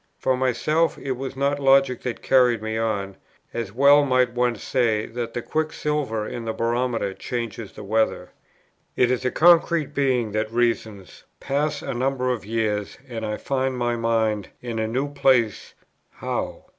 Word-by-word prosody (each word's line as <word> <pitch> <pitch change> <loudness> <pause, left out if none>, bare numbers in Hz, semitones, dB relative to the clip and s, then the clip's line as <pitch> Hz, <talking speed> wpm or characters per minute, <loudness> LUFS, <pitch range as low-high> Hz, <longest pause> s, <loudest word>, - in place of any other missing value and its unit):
For 130 - +1
myself, 150 +6 +1
it 135 - -5
was 130 +1 -4
not 140 +1 0
logic 135 -2 +4
that 125 -2 -5
carried 125 -3 +4
me 110 +1 -4
on; 105 -4 -2 0.4
as 115 -4 -4
well 140 +5 +6
might 130 -3 +2
one 120 -1 +1
say 115 -2 0
that 115 0 -5
the 120 - -3
quicksilver 150 -8 -2
in 120 -1 -6
the 110 - -2
barometer 115 -3 -1
changes 115 -1 -5
the - - -9
weather. 110 +2 0 0.6
It 125 0 +3
is 125 - 0
the 130 - 0
concrete 170 -1 +4
being 130 -6 +1
that 110 +1 -2
reasons; 115 -5 -2
pass 145 +2 -1
a - - -3
number 130 +1 0
of 120 -3 -3
years, 105 -1 -2
and 115 -3 -6
I 105 -1 -2
find 130 -1 -1
my 120 -1 0
mind 110 -3 0
in 115 -2 -4
a 110 - 0
new 130 +5 -1
place; 130 -6 +1 0.3
how? - - -4
120 Hz, 165 wpm, -23 LUFS, 110-135 Hz, 0.6 s, well